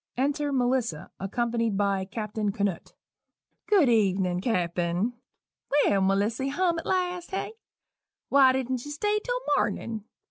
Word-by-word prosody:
_ - - -67 0.2
(Enter 290 +1 0
Melissa, 245 - 0
accompanied 230 +1 -1
by 200 -1 +1
Captain 210 0 -3
Canoot.) 200 -3 -2 0.7
"Good 390 -9 +5
evenin', 190 -5 +2
Cappen 180 0 0 0.7
Well, 200 -1 +3
Melissy, 205 +7 +1
hum 340 +4 +1
at - - -8
last, 360 -1 -1
hey? 385 +3 -3 0.7
Why 270 -2 +6
didn't 260 -1 -2
you 290 - -8
stay 415 +8 0
till - - -1 0.2
mornin'? 220 -2 -2
230 Hz, 130 wpm, -27 LUFS, 195-285 Hz, 0.7 s, Why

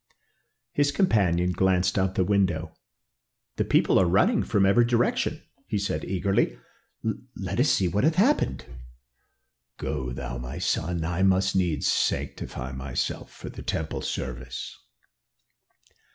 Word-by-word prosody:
His 145 0 +2
companion 90 - +2
glanced 95 0 +2
out 95 -1 +2
of - - -15
the 95 - +3
window. 90 -4 +1 0.8
"The - - +2
people - - +3
are 95 - +4
running 180 - +3
from 100 -3 +2
every 100 +5 +5
direction," 155 - 0 0.2
he 105 - -1
said 100 +1 -2
eagerly. 95 -9 0 0.8
"Let - - -4
us - - +4
see 95 - +3
what 100 +6 0
hath 160 +2 +3
happened." 245 +11 +2 1.1
"Go 65 -5 -3
thou, 65 0 -5
my 60 0 -6
son. 85 0 -1
I 90 +2 -1
must 95 0 +3
needs 85 -6 +1
sanctify 65 +1 -1
myself 65 0 -3
for - - -9
the - - -9
temple 80 -1 -3
service." 60 -1 -5
95 Hz, 135 wpm, -26 LUFS, 80-105 Hz, 1.1 s, every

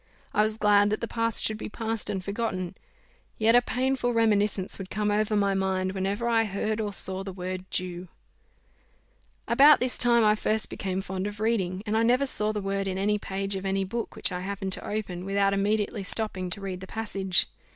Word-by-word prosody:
I - - +3
was 215 0 0
glad 205 -1 +4
that 215 - -1
the 230 - -3
past 230 -1 +1
should 215 0 -1
be - - -5
past 225 0 -3
and 190 -2 -3
forgotten; 200 -4 -3 0.6
yet 225 +1 +4
a 245 - +7
painful 255 0 0
reminiscence 210 -4 +1
would 190 -1 -7
come 210 0 -1
over 215 +1 +1
my 200 -1 +2
mind, 190 -1 0
whenever 195 +4 -2
I 225 -1 +3
heard 215 +2 -2
or 210 -1 -2
saw 190 0 +2
the 195 - -6
word 185 0 -5
Jew. 180 0 -3 1.4
About 280 +5 +7
this 250 0 -1
time 235 -2 +5
I 210 - +5
first 215 0 +1
became 190 -1 -3
fond 190 +1 -3
of 205 0 -7
reading, 200 -4 0
and 215 0 -1
I 225 - +3
never 250 +4 +3
saw 215 -5 0
the 210 -1 -3
word 195 0 -2
in 190 -1 -2
any 210 +2 +1
page 195 0 -3
of 190 - -4
any 195 0 0
book 225 +4 -4
which - - 0
I 180 - -3
happened 195 0 -3
to - - -4
open, 195 -4 -4
without 195 +1 +1
immediately 205 +2 0
stopping 190 -2 -3
to 200 - -4
read 190 -2 -5
the 190 - -9
passage. 195 -4 0
205 Hz, 205 wpm, -27 LUFS, 190-220 Hz, 1.4 s, a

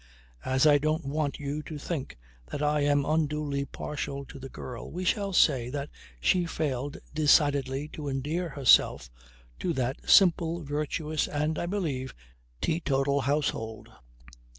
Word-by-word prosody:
As 130 +2 +2
I 145 -1 +6
don't 155 +1 0
want 145 0 -1
you 145 +1 -3
to 150 0 -7
think 145 - -5 0.3
that 145 - -4
I 150 0 +2
am 145 -1 +2
unduly 150 -2 0
partial 140 -1 -5
to 135 - -11
the 135 0 -8
girl 120 -2 -8
we 180 +3 -4
shall 200 +1 +1
say 130 -9 +3
that 140 +2 -4 0.3
she 175 - +2
failed 145 -3 -2 0.2
decidedly 145 -2 +3
to 150 -2 -7
endear 150 +6 -2
herself 135 - +4 0.5
to 175 - -1
that 130 -2 -3
simple, 170 -3 +5
virtuous 150 +2 -2
and, 150 +1 -1
I 170 - -2
believe, 150 - -3 0.5
teetotal 140 -3 +1
household. 130 -6 -2
145 Hz, 140 wpm, -28 LUFS, 135-155 Hz, 0.5 s, I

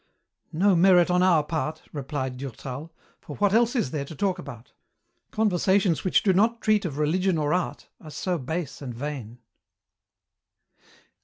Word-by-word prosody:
"No 185 +4 +3
merit 180 0 +5
on 180 0 +3
our 175 -5 +4
part," 160 0 -3
replied 135 -3 -4
Durtal, 135 +3 -7 0.3
"for 145 - -9
what 205 -1 +1
else 235 +3 +3
is 180 - 0
there 145 -3 -2
to 155 - -10
talk 190 +3 -1
about? 125 -8 -10 0.6
Conversations 190 -4 +1
which 185 - +2
do 195 - +3
not 225 +5 +2
treat 215 -3 +2
of 145 -5 -4
religion 175 +4 +1
or 150 -1 0
art 180 0 -2
are 155 - -12
so 175 +3 -2
base 150 +2 -4
and 125 -4 -6
vain." 125 -4 -6
165 Hz, 155 wpm, -25 LUFS, 145-190 Hz, 0.6 s, merit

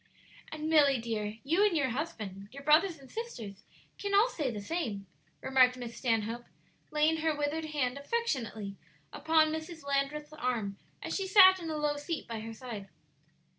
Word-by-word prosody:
"And, 310 0 -4
Milly 290 -4 +5
dear, 220 -2 -3
you 335 +9 +3
and 405 -6 +3
your 275 -3 +1
husband, 215 - -5
your 280 +2 -10
brothers 320 +4 +4
and 275 -1 -15
sisters, 225 - -7 0.3
can 400 0 -1
all 430 +5 +5
say 300 - -2
the 220 -4 -4
same," 205 - -3 0.4
remarked 255 -1 +4
Miss 240 -2 -7
Stanhope, 230 -1 -1 0.4
laying 305 +1 +2
her 315 -1 0
withered 295 +2 -1
hand 280 -4 -1
affectionately 250 - -2 0.4
upon 315 -1 +3
Mrs. 315 -1 -6
Landreth's 280 +2 -1
arm 235 -9 -2 0.2
as - - -3
she 390 -1 -1
sat 375 -1 +8
in 330 -2 -5
a 310 - -2
low 295 -1 0
seat 300 +1 -4
by 230 -2 -4
her 225 +1 -6
side. 220 -5 -7
285 Hz, 170 wpm, -31 LUFS, 230-320 Hz, 0.4 s, sat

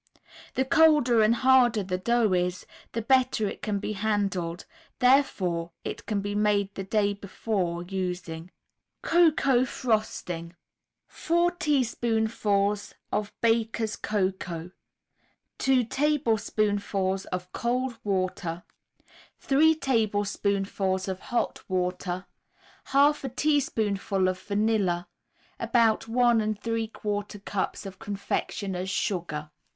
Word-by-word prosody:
The 260 - +1
colder 300 -6 +5
and 215 +2 +4
harder 245 -4 +4
the 185 -1 -2
dough 235 0 +2
is, 180 0 -1 0.3
the 230 - -2
better 250 -3 +2
it - - -6
can 210 -2 -1
be 210 +1 -3
handled; 195 -5 -1 0.3
therefore 190 -11 +2
it - - -6
can 205 -2 0
be 205 +1 -3
made 205 -1 +1
the 195 - -5
day 205 +1 +1
before 190 -3 -3
using. 180 -2 -4 0.5
COCOA 295 -7 +4
FROSTING 180 -9 -2 0.5
4 345 +1 +1
teaspoonfuls 220 - 0 0.2
of 210 0 -1
Baker's 225 -1 +1
Cocoa, 185 -4 -2 0.9
2 265 -2 +3
tablespoonfuls 215 -8 0
of 180 0 -5
cold 245 0 -1
water, 185 -3 -2 0.7
3 315 +4 +4
tablespoonfuls 200 -6 0
of 190 -1 -3
hot 240 +2 -2
water, 180 0 -2 0.6
1/2 285 +2 +3
a 265 - -2
teaspoonful 220 -9 0
of 185 0 -1
vanilla, 200 -4 0 0.5
About 230 -2 +2
1 230 -2 +2
3/4 210 -2 -4
cups 200 +1 -3
of 190 -1 -8
confectioners' 195 -2 -3
sugar. 165 -6 -2
210 Hz, 105 wpm, -27 LUFS, 190-235 Hz, 0.9 s, colder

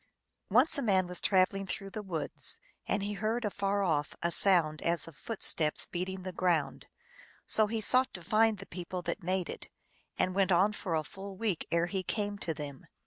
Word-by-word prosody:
Once 250 +9 +4
a - - -1
man 195 -6 +3
was 180 0 -2
traveling 195 0 +2
through 195 +1 -5
the 215 - -5
woods, 185 - -4 0.3
and 200 - 0
he 205 +1 -2
heard 220 +3 -1
afar 200 0 0
off 150 -5 0
a 170 - +1
sound 165 -5 +3
as 170 0 +1
of 165 - -12
footsteps 165 - +3
beating 185 +1 -4
the 185 - -4
ground. 175 -5 0 0.6
So 215 -1 +3
he 225 +1 -2
sought 255 +4 +4
to 175 - -7
find 220 +1 +3
the 195 - -9
people 180 0 -6
that 205 - -3
made 185 0 -1
it, - - -7 0.5
and 185 - +1
went 195 -1 +2
on 190 +4 +4
for 180 -5 -3
a 155 - 0
full 195 +4 -9
week 205 -6 -2
ere 170 0 +2
he 190 +2 -2
came 205 +1 -2
to 165 - -2
them. 140 -3 -8
190 Hz, 195 wpm, -31 LUFS, 175-205 Hz, 0.6 s, Once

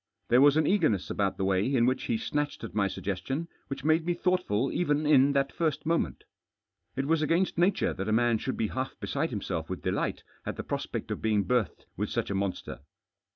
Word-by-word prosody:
There 125 +2 +6
was 145 +1 +6
an 155 - +3
eager 180 -3 +3
ness 100 -4 -2
afcout 100 -2 0
the 95 - -1
way 95 0 +2
in 120 -4 +3
which 130 +1 0
he 115 - 0
snatched 145 +5 -2
at 115 - -6
my 100 -2 +2
suggestion 100 - -3 0.2
which 135 -1 -6
made 155 +2 +3
me 175 +1 0
thonghtful 175 - 0
even 150 -3 +1
in 140 -2 +5
that 140 0 +1
first 160 -4 -1
moment 165 +1 0 0.7
It 135 - -1
was 160 +1 +2
against 165 +3 +1
nature 185 +3 +2
that 95 +2 -4
a - - +1
man 115 0 +3
should 130 - -3
]>e 110 -2 0
half 130 +1 -4
beside - - -1
himself - - -4
with - - -5
delight - - -1 0.2
at - - -4
the - - -5
prospect - - -4
pf - - -3
being 105 -2 +2
berthed 120 -8 -1
with - - -1
such - - -2
a - - 0
monster. 100 -1 -3
135 Hz, 215 wpm, -29 LUFS, 110-155 Hz, 0.7 s, There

